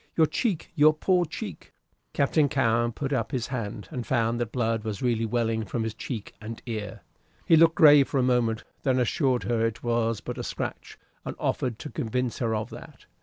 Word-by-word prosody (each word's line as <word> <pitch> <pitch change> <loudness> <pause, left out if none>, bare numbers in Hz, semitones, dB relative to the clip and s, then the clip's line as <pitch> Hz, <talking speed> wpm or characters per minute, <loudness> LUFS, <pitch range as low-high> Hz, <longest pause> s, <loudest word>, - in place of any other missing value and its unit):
Your 160 - +5
cheek 190 - -2
your 155 -1 +5
poor 180 +2 +2
cheek!" - - -8 0.4
Captain 145 +1 +3
Cowen 120 -3 +2
put 135 +4 -3
up 115 -4 -1
his 125 -3 -1
hand, 105 -5 -4
and 125 - -4
found 120 -1 0
that 115 -2 -2
blood 115 -3 0
was 110 -1 -4
really 115 -2 +1
welling 115 -1 0
from 110 +3 -3
his 110 -1 -3
cheek 110 -1 -6
and 110 +1 -7
ear. 110 -4 -5 0.4
He 165 - +6
looked 165 0 +5
grave 145 -5 +7
for - - -1
a 130 - +3
moment, 120 -3 +1 0.2
then 130 -2 +1
assured 125 +1 +1
her 115 -1 0
it 115 -1 -2
was 115 -2 0
but - - -6
a - - -3
scratch, - - -5 0.3
and - - -5
offered 125 -4 -1
to 150 - -8
convince 125 +1 -2
her 115 -2 0
of 110 0 -4
that. - - -12
120 Hz, 200 wpm, -26 LUFS, 115-135 Hz, 0.4 s, grave